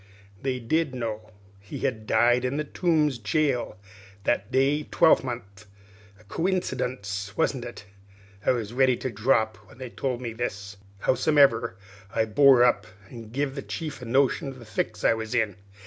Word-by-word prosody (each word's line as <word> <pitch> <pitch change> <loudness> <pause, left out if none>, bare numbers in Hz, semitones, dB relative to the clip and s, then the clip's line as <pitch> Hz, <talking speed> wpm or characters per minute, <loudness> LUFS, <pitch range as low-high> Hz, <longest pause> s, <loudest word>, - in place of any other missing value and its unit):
They 130 -2 -1
did 145 +3 0
know 110 -3 -4 0.3
he 100 0 -8
had 110 -5 -2
died 120 +1 +3
in 130 +3 -1
the 150 - 0
Tombs 150 -4 +1
jail 125 - 0 0.5
that 120 - 0
day 135 +3 +2
twelvemonth. 120 - +1 0.5
A - - -19
coincydunce, 125 - -2
wasn't 135 -6 0
it? 120 -4 -9 0.6
I - - +1
was 115 -3 0
ready 130 -1 +3
to 130 - -4
drop 110 0 +1
when - - -19
they 130 -2 -7
told 125 -2 -2
me 120 -2 -5
this; 100 -4 -5 0.2
howsomever, 140 -9 +3 0.4
I 110 - +3
bore 130 +2 +6
up 105 -4 +2 0.2
an' 115 -3 -9
give 135 +3 -2
the 140 - -5
chief 150 -1 -6
a - - -7
notion 135 +5 +2
of 135 -1 -7
the 120 - -12
fix 105 0 -3
I - - +5
was 110 +1 -4
in. 105 -5 0
125 Hz, 165 wpm, -26 LUFS, 110-135 Hz, 0.6 s, bore